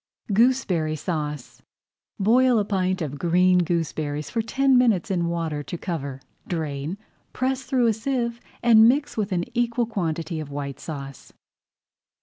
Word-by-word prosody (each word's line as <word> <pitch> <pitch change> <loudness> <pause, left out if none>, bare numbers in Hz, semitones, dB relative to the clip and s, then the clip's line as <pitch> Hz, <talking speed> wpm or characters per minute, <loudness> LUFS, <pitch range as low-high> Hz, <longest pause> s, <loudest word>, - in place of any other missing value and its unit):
GOOSEBERRY 195 -9 +2
SAUCE 150 -4 -4 0.6
Boil 245 +4 +4
a 210 - +1
pint 185 -3 0
of 145 -2 -5
green 180 +1 +4
gooseberries 155 -4 -2
for 230 - 0
ten 270 +4 +2
minutes 230 -8 +3
in 175 -3 0
water 165 -3 -2
to 145 +5 -6
cover. 140 -7 -4 0.3
Drain, 155 0 -3 0.4
press 260 +1 -1
through 255 -2 +2
a 225 - +4
sieve, 235 +1 -2 0.2
and 225 -1 +7
mix 285 +3 0
with 215 -2 -2
an 175 -2 0
equal 240 0 +1
quantity 165 -6 -3
of 155 -2 -6
White 140 -1 -5
Sauce. 140 -3 -8
180 Hz, 140 wpm, -24 LUFS, 155-235 Hz, 0.6 s, and